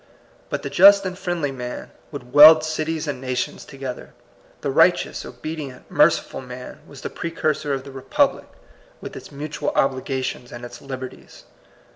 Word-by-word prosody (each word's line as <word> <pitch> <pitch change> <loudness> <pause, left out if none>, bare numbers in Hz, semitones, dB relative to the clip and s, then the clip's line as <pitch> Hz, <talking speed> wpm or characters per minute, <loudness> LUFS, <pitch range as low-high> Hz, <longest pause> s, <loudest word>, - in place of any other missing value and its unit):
But - - -3
the 140 - -3
just 195 +6 +7
and 185 -1 -3
friendly 175 -6 -2
man 125 -2 -7 0.2
would 125 -4 -9
weld 155 +2 +10
cities 155 0 -2
and 140 -3 -4
nations 130 -1 -3
together. 135 -3 -8 0.5
The - - -1
right - - +6
eous, - - -6
obedient, 155 -5 -8
merciful - - +2
man 125 0 -9
was 140 -2 -12
the - - -4
pre 170 - -4
cursor 155 -3 -1
of 135 -1 -2
the 140 - -10
republic, 135 -1 0 0.5
with - - -9
its - - -10
mutual 145 +2 -4
obligations 130 -2 -1
and 120 0 -8
its 120 0 -11
liberties. 130 -2 -9
140 Hz, 160 wpm, -22 LUFS, 130-155 Hz, 0.5 s, weld